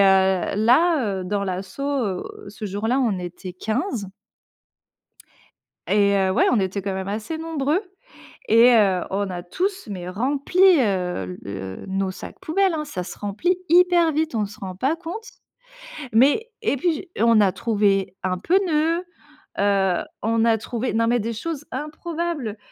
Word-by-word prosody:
là, 200 Hz, -, +3 dB
heu, -, -, -5 dB
dans 200 Hz, +1 st, -1 dB
l'asso, 190 Hz, +7 st, -5 dB, 0.7 s
ce 210 Hz, +1 st, -7 dB
jour-là, 220 Hz, +6 st, -1 dB, 0.2 s
était 180 Hz, +1 st, -7 dB
15. 220 Hz, -, -3 dB, 1.8 s
Et, 200 Hz, -1 st, +3 dB
heu, 190 Hz, -1 st, +2 dB
ouais, -, -, +3 dB
on 235 Hz, -, +3 dB
était 195 Hz, +1 st, -1 dB
quand 195 Hz, 0 st, -3 dB
même 190 Hz, 0 st, -4 dB
assez 215 Hz, +10 st, -4 dB
nombreux. 320 Hz, +2 st, -1 dB, 0.7 s
Et, 230 Hz, +3 st, +7 dB
heu, 195 Hz, -5 st, +3 dB
on 195 Hz, 0 st, -1 dB
a 175 Hz, -1 st, -5 dB
tous, 375 Hz, -, -3 dB
mais 180 Hz, -2 st, -5 dB
rempli, 275 Hz, -, -1 dB, 0.2 s
heu, 180 Hz, -, -1 dB
le 95 Hz, -1 st, -7 dB
nos 195 Hz, 0 st, -1 dB
sacs -, -, -9 dB
poubelles, 380 Hz, 0 st, +1 dB
hein. 305 Hz, -1 st, -2 dB
Ça 185 Hz, -11 st, -5 dB
se 180 Hz, -, -9 dB
remplit 225 Hz, -, 0 dB
hyper 345 Hz, -1 st, +5 dB
vite. 310 Hz, -3 st, -1 dB
On 215 Hz, -, +1 dB
se 205 Hz, -, -13 dB
rend 185 Hz, -2 st, -6 dB
pas 275 Hz, -, 0 dB
compte. 355 Hz, +7 st, -7 dB, 0.9 s
Mais 285 Hz, -, +4 dB
et 425 Hz, -, +1 dB
puis 340 Hz, +4 st, +1 dB
j 340 Hz, +4 st, -7 dB
on 230 Hz, -2 st, +5 dB
a 195 Hz, -2 st, +4 dB
trouvé 205 Hz, -4 st, +1 dB
un 185 Hz, -1 st, 0 dB
pneu, 335 Hz, -, +1 dB, 0.5 s
heu, 195 Hz, -3 st, +2 dB, 0.2 s
on 225 Hz, 0 st, +2 dB
a 225 Hz, -1 st, +4 dB
trouvé 240 Hz, +3 st, -3 dB
non 230 Hz, 0 st, +2 dB
mais 240 Hz, +1 st, +2 dB
des 230 Hz, +2 st, -3 dB
choses 300 Hz, +5 st, -5 dB
improbables, 305 Hz, -4 st, -4 dB
225 Hz, 155 wpm, -23 LUFS, 195-315 Hz, 1.8 s, Et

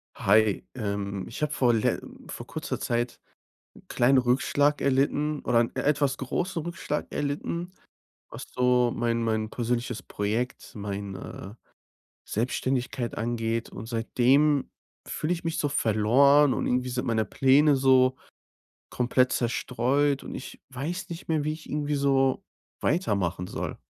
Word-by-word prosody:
Hi, 105 Hz, +1 st, +3 dB
ähm, 100 Hz, -4 st, -3 dB
ich 115 Hz, -, -8 dB
habe 150 Hz, -, 0 dB
vor 125 Hz, -5 st, +3 dB
le 110 Hz, -, +1 dB, 0.3 s
vor -, -, -8 dB
kurzer -, -, -4 dB
Zeit 120 Hz, 0 st, -2 dB, 0.6 s
'n -, -, -18 dB
kleinen 130 Hz, +3 st, +3 dB
Rückschlag 140 Hz, +4 st, +2 dB
erlitten 145 Hz, +2 st, +1 dB
oder 120 Hz, -1 st, +2 dB
'n 115 Hz, -, 0 dB
e -, -, -1 dB
etwas 140 Hz, -2 st, +1 dB
großen 170 Hz, +6 st, -2 dB
Rückschlag 170 Hz, -3 st, -3 dB
erlitten, 155 Hz, +5 st, -3 dB, 0.6 s
was -, -, -8 dB
so 125 Hz, -1 st, +3 dB
mein 115 Hz, -1 st, 0 dB
mein 110 Hz, -1 st, 0 dB
persönliches 120 Hz, 0 st, -2 dB
Projekt, 110 Hz, +5 st, -3 dB
meine 100 Hz, 0 st, -6 dB, 0.7 s
Selbstständigkeit 125 Hz, +1 st, -2 dB
angeht. 115 Hz, 0 st, -2 dB
Und 110 Hz, -, -8 dB
seitdem 130 Hz, +5 st, +2 dB, 0.4 s
fühle 155 Hz, +3 st, -2 dB
ich 170 Hz, -, -6 dB
mich 165 Hz, -1 st, -2 dB
so 145 Hz, -, +1 dB
verloren. 135 Hz, +4 st, +4 dB
Und -, -, -2 dB
irgendwie 125 Hz, 0 st, 0 dB
sind 125 Hz, 0 st, -2 dB
meine 110 Hz, -2 st, +1 dB
Pläne 140 Hz, +2 st, +4 dB
so 130 Hz, -1 st, +4 dB, 0.8 s
komplett 125 Hz, +1 st, +2 dB
zerstreut 130 Hz, +4 st, 0 dB
und -, -, -7 dB
ich -, -, -8 dB
weiß 155 Hz, +9 st, -4 dB
nicht 170 Hz, 0 st, -8 dB
mehr, 155 Hz, -3 st, +1 dB
wie 155 Hz, -, 0 dB
ich 155 Hz, 0 st, -10 dB
irgendwie 150 Hz, 0 st, -1 dB
so 135 Hz, -1 st, +2 dB, 0.4 s
weitermachen 100 Hz, -, 0 dB
soll. -, -, -5 dB
125 Hz, 140 wpm, -27 LUFS, 115-145 Hz, 0.8 s, verloren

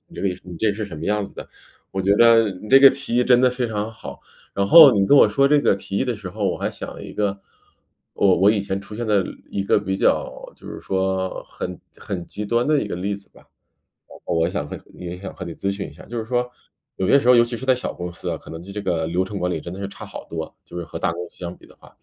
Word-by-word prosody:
这 -, -, -6 dB
个 100 Hz, -, +1 dB, 0.2 s
你 90 Hz, -2 st, -9 dB
这 110 Hz, -2 st, +1 dB
是 105 Hz, +1 st, -4 dB
什 80 Hz, -6 st, -9 dB
么 80 Hz, -, -6 dB
样 105 Hz, 0 st, +1 dB
子 -, -, -9 dB
的。 -, -, -8 dB, 0.4 s
我 95 Hz, -, -2 dB
觉 95 Hz, +1 st, +2 dB
得 115 Hz, -1 st, +6 dB
你 95 Hz, +3 st, -9 dB
这 135 Hz, +3 st, +7 dB
个 135 Hz, -, +10 dB
提 135 Hz, -2 st, -4 dB
议 125 Hz, -, +4 dB
真 125 Hz, -1 st, +5 dB
的 130 Hz, 0 st, +4 dB
非 125 Hz, -1 st, -2 dB
常 105 Hz, 0 st, -3 dB
好！ -, -, -10 dB, 0.4 s
然 100 Hz, -, +1 dB
后 155 Hz, -2 st, +10 dB
你 100 Hz, -1 st, +3 dB
跟 145 Hz, -, +5 dB
我 110 Hz, -, +7 dB
说 140 Hz, +6 st, +3 dB
这 145 Hz, 0 st, +4 dB
个 -, -, +3 dB
提 95 Hz, 0 st, -7 dB
议 -, -, +1 dB
的 125 Hz, -3 st, -2 dB
时 105 Hz, -3 st, -8 dB
候， 105 Hz, +3 st, -5 dB
我 -, -, -3 dB
还 -, -, -2 dB
想 -, -, -6 dB
了 -, -, -9 dB
一 -, -, -9 dB
个， 100 Hz, -1 st, -1 dB, 0.8 s
我 95 Hz, -2 st, +4 dB
我 95 Hz, +4 st, +5 dB
以 105 Hz, -1 st, +2 dB
前 100 Hz, 0 st, -3 dB
出 105 Hz, +1 st, -10 dB
现 120 Hz, +1 st, -3 dB
的 105 Hz, -3 st, +2 dB, 0.3 s
一 100 Hz, -, -2 dB
个 100 Hz, -, +3 dB
比 95 Hz, 0 st, -2 dB
较 -, -, 0 dB
就 -, -, -14 dB
是 -, -, -7 dB
说 95 Hz, -1 st, -2 dB
很 90 Hz, 0 st, -7 dB, 0.2 s
很 95 Hz, -4 st, -5 dB
极 105 Hz, -, -6 dB
端 120 Hz, +2 st, +1 dB
的 150 Hz, -1 st, +2 dB
一 105 Hz, -, -3 dB
个 -, -, -4 dB
例 100 Hz, +3 st, -2 dB
子 100 Hz, 0 st, -14 dB
吧。 -, -, -20 dB, 0.7 s
然 -, -, -13 dB
后 -, -, -1 dB
我 80 Hz, 0 st, +2 dB
想 90 Hz, -7 st, -3 dB
和 -, -, -6 dB, 0.2 s
也 90 Hz, 0 st, -7 dB
想 95 Hz, -, -8 dB
和 -, -, -10 dB
你 85 Hz, -2 st, -6 dB
咨 100 Hz, -, -2 dB
询 100 Hz, -, -5 dB
一 -, -, -12 dB
下， -, -, -14 dB
就 120 Hz, +1 st, -6 dB
是 110 Hz, -, -4 dB
说 125 Hz, +1 st, 0 dB, 0.5 s
有 95 Hz, -, -1 dB
些 140 Hz, -, +6 dB
时 125 Hz, -2 st, +3 dB
候 -, -, +8 dB
尤 120 Hz, -, +7 dB
其 120 Hz, 0 st, -3 dB
是 130 Hz, -, -7 dB
在 130 Hz, -1 st, +4 dB
小 125 Hz, -, -4 dB
公 90 Hz, -1 st, -6 dB
司 90 Hz, -, -6 dB
啊， 85 Hz, -, -1 dB
可 -, -, -13 dB
能 80 Hz, 0 st, -7 dB
对 100 Hz, +2 st, -10 dB
这 105 Hz, -, -4 dB
个 80 Hz, -4 st, -1 dB
流 90 Hz, +3 st, 0 dB
程 100 Hz, +1 st, -6 dB
管 90 Hz, 0 st, -1 dB
理 80 Hz, -, -2 dB
真 85 Hz, +3 st, -8 dB
的 95 Hz, -, -8 dB
是 100 Hz, -, -4 dB
差 100 Hz, -, -10 dB
好 -, -, -9 dB
多， 80 Hz, -1 st, -6 dB
就 90 Hz, -, -8 dB
是 85 Hz, -, -4 dB
和 85 Hz, -, -7 dB
大 85 Hz, -, 0 dB
公 90 Hz, +1 st, -6 dB
司 -, -, -11 dB
相 85 Hz, 0 st, -6 dB
比 -, -, -18 dB
的 -, -, -19 dB
话。 -, -, -19 dB
100 Hz, 325 characters per minute, -22 LUFS, 90-115 Hz, 0.8 s, 个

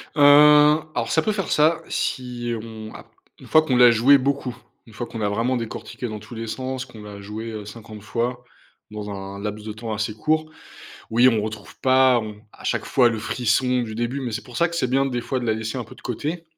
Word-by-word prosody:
Heu 145 Hz, -, +1 dB, 0.7 s
alors, -, -, -1 dB
ça 160 Hz, -, +3 dB
peut 215 Hz, -, 0 dB
faire 195 Hz, -4 st, -3 dB
ça 155 Hz, +2 st, +3 dB
si 120 Hz, -2 st, -2 dB
on 110 Hz, -1 st, -9 dB
a -, -, -11 dB, 0.3 s
une -, -, -13 dB
fois 155 Hz, -, +6 dB
que 155 Hz, -, -8 dB
l'on 125 Hz, -, +4 dB
l'a 125 Hz, -1 st, +8 dB
joué 130 Hz, +5 st, +6 dB
beaucoup, 135 Hz, -2 st, -2 dB, 0.3 s
une 110 Hz, -, -16 dB
fois 120 Hz, +3 st, -4 dB
que 115 Hz, -, -9 dB
l'on 110 Hz, -, -3 dB
a 100 Hz, -, +1 dB
vraiment 120 Hz, +5 st, 0 dB
décortiqué 120 Hz, +1 st, -6 dB
dans 110 Hz, -1 st, -6 dB
tous 110 Hz, +4 st, -12 dB
les 115 Hz, 0 st, -5 dB
sens, 130 Hz, +2 st, -4 dB
que 120 Hz, -3 st, -15 dB
on 105 Hz, -, -10 dB
l'a 100 Hz, -1 st, -9 dB
joué 110 Hz, +1 st, -6 dB
50 105 Hz, -1 st, -10 dB
fois 120 Hz, +3 st, -3 dB, 0.5 s
dans 105 Hz, -1 st, -6 dB
un 100 Hz, 0 st, -7 dB
laps 105 Hz, 0 st, -5 dB
de 105 Hz, -, -4 dB
temps 110 Hz, 0 st, -5 dB
assez 105 Hz, 0 st, -2 dB
court. 155 Hz, +7 st, 0 dB, 0.6 s
Oui, 120 Hz, +3 st, +5 dB
on -, -, 0 dB
ne 110 Hz, -, +1 dB
retrouve 110 Hz, -1 st, -7 dB
pas 130 Hz, -1 st, +4 dB
on 105 Hz, -1 st, -6 dB, 0.2 s
à -, -, -16 dB
chaque -, -, -1 dB
fois 125 Hz, -3 st, +4 dB
le 110 Hz, -, -3 dB
frisson 125 Hz, +3 st, +1 dB
du 110 Hz, -2 st, -6 dB
début, 120 Hz, +4 st, -2 dB
mais 120 Hz, -3 st, -3 dB
c'est -, -, -4 dB
pour 125 Hz, -, -9 dB
ça 170 Hz, -, +3 dB
que 170 Hz, -, -7 dB
c'est 130 Hz, -7 st, 0 dB
bien 135 Hz, +2 st, +2 dB
des 125 Hz, -3 st, -2 dB
fois 130 Hz, +2 st, -2 dB
de 120 Hz, -, -4 dB
la 110 Hz, -, +2 dB
laisser 110 Hz, +3 st, -4 dB
un 125 Hz, -, -3 dB
peu -, -, -14 dB
de -, -, -17 dB
côté 155 Hz, +8 st, -4 dB
120 Hz, 250 wpm, -23 LUFS, 110-130 Hz, 0.7 s, l'a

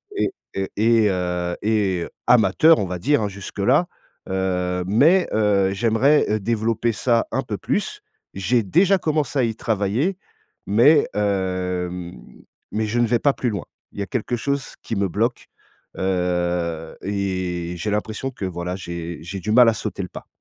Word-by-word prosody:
et 390 Hz, -, 0 dB, 0.2 s
et 95 Hz, 0 st, -2 dB
et, 110 Hz, -1 st, +4 dB
heu 90 Hz, -1 st, -1 dB
et 100 Hz, -5 st, +1 dB, 0.2 s
amateur, 125 Hz, -, +5 dB
on 100 Hz, -, 0 dB
va 90 Hz, -1 st, -4 dB
dire, 145 Hz, +6 st, +2 dB
hein, 105 Hz, -, -1 dB
jusque 100 Hz, -1 st, -9 dB
là, -, -, +3 dB, 0.4 s
heu, 90 Hz, -1 st, -1 dB
mais, 155 Hz, -, +4 dB
heu, 100 Hz, -3 st, +2 dB
j'aimerais, 120 Hz, +8 st, +3 dB
heu, 110 Hz, +1 st, +1 dB
développer 115 Hz, +2 st, 0 dB
ça 115 Hz, +1 st, +1 dB
un -, -, 0 dB
peu -, -, -4 dB
plus. -, -, -2 dB, 0.3 s
J'ai 115 Hz, +5 st, +1 dB
déjà 185 Hz, -, +3 dB
commencé 150 Hz, -3 st, 0 dB
à -, -, +3 dB
y 115 Hz, -2 st, -1 dB
travailler 115 Hz, -, 0 dB, 0.5 s
mais, 130 Hz, +9 st, +5 dB
hem, 90 Hz, -3 st, -2 dB, 0.6 s
mais 110 Hz, +1 st, -1 dB
je 120 Hz, +3 st, -1 dB
ne 120 Hz, -, +3 dB
vais 120 Hz, +1 st, +2 dB
pas 140 Hz, +3 st, +3 dB
plus 125 Hz, -, -1 dB
loin. 100 Hz, -5 st, -4 dB, 0.3 s
Il -, -, -10 dB
y -, -, -1 dB
a -, -, -7 dB
quelque 120 Hz, 0 st, -2 dB
chose 140 Hz, +2 st, -3 dB
qui 115 Hz, -, -3 dB
me 100 Hz, 0 st, +1 dB
bloque, 115 Hz, +6 st, -1 dB, 0.5 s
heu 90 Hz, -3 st, -1 dB
et 95 Hz, -3 st, -2 dB
j'ai 105 Hz, -, -3 dB
l'impression 110 Hz, +5 st, -2 dB
que, 100 Hz, -, -6 dB
voilà, 90 Hz, 0 st, -4 dB
j'ai 85 Hz, -2 st, -6 dB
j'ai 95 Hz, +3 st, -6 dB
du 105 Hz, -, -2 dB
mal 125 Hz, +1 st, +7 dB
à 115 Hz, -, +1 dB
sauter 100 Hz, -1 st, -4 dB
le 90 Hz, -, -7 dB
pas. -, -, -10 dB
100 Hz, 175 wpm, -22 LUFS, 90-120 Hz, 0.6 s, mal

